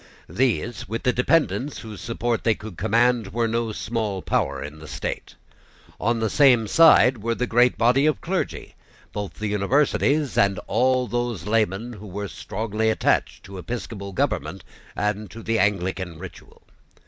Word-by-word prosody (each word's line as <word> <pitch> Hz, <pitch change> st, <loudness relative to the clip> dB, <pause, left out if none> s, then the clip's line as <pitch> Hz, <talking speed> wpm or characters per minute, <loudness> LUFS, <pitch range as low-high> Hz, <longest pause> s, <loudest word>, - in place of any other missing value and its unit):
These, 115 Hz, -4 st, -1 dB
with 115 Hz, +1 st, -4 dB
the 125 Hz, -, +2 dB
dependents 145 Hz, +1 st, +1 dB
whose 110 Hz, -4 st, -9 dB
support 115 Hz, 0 st, -2 dB
they 115 Hz, -2 st, +3 dB
could 105 Hz, -4 st, -9 dB
command, 120 Hz, +3 st, +2 dB
were 115 Hz, +2 st, 0 dB
no 115 Hz, 0 st, -1 dB
small 105 Hz, -3 st, -3 dB
power -, -, -1 dB
in 75 Hz, +2 st, -9 dB
the 80 Hz, -, -11 dB
state. -, -, -5 dB, 0.6 s
On 115 Hz, +1 st, 0 dB
the 110 Hz, -, +1 dB
same 130 Hz, -6 st, +5 dB
side 125 Hz, -2 st, +6 dB
were 115 Hz, +2 st, -1 dB
the 125 Hz, -, -1 dB
great 120 Hz, +1 st, +3 dB
body 125 Hz, +5 st, +3 dB
of 155 Hz, -, +3 dB
the -, -, -27 dB
clergy, 185 Hz, +2 st, -3 dB, 0.4 s
both 105 Hz, -2 st, -5 dB
the 110 Hz, -, -5 dB
Universities, 135 Hz, +6 st, +1 dB
and 100 Hz, -1 st, +3 dB
all 130 Hz, +2 st, +2 dB
those 120 Hz, -7 st, -3 dB
laymen 110 Hz, +1 st, 0 dB
who 105 Hz, -1 st, -10 dB
were 100 Hz, +2 st, -5 dB
strongly 110 Hz, +3 st, -2 dB
attached 110 Hz, -, 0 dB
to 95 Hz, -1 st, -9 dB
episcopal 100 Hz, -2 st, -6 dB
government 90 Hz, -, -2 dB, 0.3 s
and 105 Hz, 0 st, -2 dB
to 115 Hz, 0 st, -10 dB
the 115 Hz, 0 st, 0 dB
Anglican 95 Hz, -3 st, -1 dB
ritual. 90 Hz, +2 st, -12 dB
115 Hz, 160 wpm, -23 LUFS, 100-120 Hz, 0.6 s, side